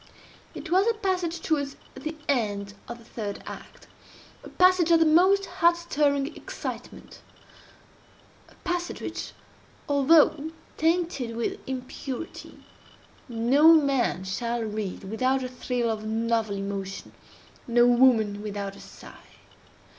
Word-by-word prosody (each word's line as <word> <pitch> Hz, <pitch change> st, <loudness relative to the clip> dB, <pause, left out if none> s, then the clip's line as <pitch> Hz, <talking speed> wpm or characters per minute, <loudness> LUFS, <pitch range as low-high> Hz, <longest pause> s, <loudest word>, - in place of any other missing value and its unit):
It -, -, -8 dB
was 380 Hz, +4 st, +4 dB
a 460 Hz, -, +2 dB
passage 360 Hz, -5 st, -2 dB
towards 285 Hz, -3 st, -1 dB, 0.2 s
the 310 Hz, +4 st, -6 dB
end 205 Hz, -7 st, -1 dB
of 235 Hz, -, -7 dB
the 235 Hz, -, -16 dB
third 210 Hz, -4 st, -6 dB
act—a -, -, -14 dB
passage 365 Hz, -2 st, +4 dB
of 335 Hz, -1 st, +6 dB
the 325 Hz, -, +5 dB
most 375 Hz, +5 st, +4 dB
heart 345 Hz, -2 st, +2 dB
stirring 290 Hz, -3 st, 0 dB
excitement—a -, -, -12 dB
passage 355 Hz, -1 st, -2 dB
which, -, -, -6 dB, 0.5 s
although 295 Hz, +1 st, +4 dB, 0.3 s
tainted 325 Hz, -7 st, 0 dB
with 235 Hz, -, -2 dB
impurity, 260 Hz, +3 st, -7 dB, 0.6 s
no 260 Hz, +8 st, +5 dB
man 275 Hz, -, +2 dB
shall 235 Hz, +5 st, -2 dB
read 210 Hz, -3 st, -4 dB
without 255 Hz, +6 st, 0 dB
a -, -, -2 dB
thrill 250 Hz, -2 st, -2 dB
of 215 Hz, -1 st, -4 dB
novel 225 Hz, -1 st, 0 dB
emotion—no 200 Hz, +4 st, -3 dB
woman 240 Hz, -5 st, +4 dB
without 200 Hz, -2 st, -5 dB
a -, -, -13 dB
sigh. -, -, -14 dB
260 Hz, 115 wpm, -26 LUFS, 225-325 Hz, 0.6 s, of